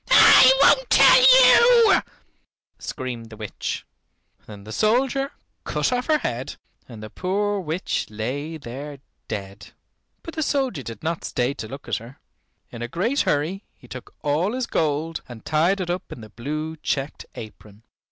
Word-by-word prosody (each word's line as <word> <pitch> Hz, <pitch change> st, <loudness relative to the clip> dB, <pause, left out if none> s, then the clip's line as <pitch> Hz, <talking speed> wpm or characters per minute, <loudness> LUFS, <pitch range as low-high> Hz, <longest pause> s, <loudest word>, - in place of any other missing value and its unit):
"I -, -, +8 dB
won't -, -, +4 dB
tell -, -, +7 dB, 0.7 s
you," -, -, +1 dB, 0.8 s
screamed 120 Hz, -3 st, -6 dB
the 110 Hz, -, -12 dB
witch. 105 Hz, -2 st, -5 dB, 0.6 s
Then 105 Hz, -2 st, -11 dB
the 110 Hz, -, -10 dB
soldier 265 Hz, -, 0 dB, 0.3 s
cut -, -, -1 dB
off 250 Hz, 0 st, -2 dB
her 310 Hz, -1 st, +3 dB
head, 125 Hz, -, -4 dB, 0.3 s
and 110 Hz, -3 st, -10 dB
the 110 Hz, -, -9 dB
poor 205 Hz, +2 st, -1 dB
witch 170 Hz, +1 st, -3 dB
lay 135 Hz, +9 st, -5 dB
there 140 Hz, +2 st, -8 dB, 0.3 s
dead. 100 Hz, -2 st, -8 dB, 0.5 s
But 330 Hz, -, -8 dB
the 315 Hz, -, -4 dB
soldier 270 Hz, -, -1 dB
did 115 Hz, -1 st, -9 dB
not 165 Hz, +1 st, -3 dB
stay 125 Hz, +2 st, -1 dB
to 115 Hz, -6 st, -8 dB
look 135 Hz, +5 st, -10 dB
at -, -, -1 dB
her. 115 Hz, +4 st, -12 dB, 0.5 s
In 120 Hz, -, -9 dB
a 120 Hz, -, -3 dB
great 210 Hz, -, -1 dB
hurry 165 Hz, +8 st, -1 dB
he 125 Hz, -, -19 dB
took 130 Hz, 0 st, -11 dB
all 155 Hz, +8 st, 0 dB
his 255 Hz, -1 st, -2 dB
gold 160 Hz, -1 st, -2 dB
and 115 Hz, -3 st, -11 dB
tied 170 Hz, +6 st, +1 dB
it 175 Hz, -2 st, -2 dB
up 180 Hz, 0 st, -5 dB
in 120 Hz, -, -9 dB
the 110 Hz, -, -12 dB
blue 155 Hz, +8 st, -5 dB
checked 145 Hz, -1 st, -4 dB
apron. 105 Hz, -1 st, -12 dB
150 Hz, 160 wpm, -23 LUFS, 115-195 Hz, 0.8 s, I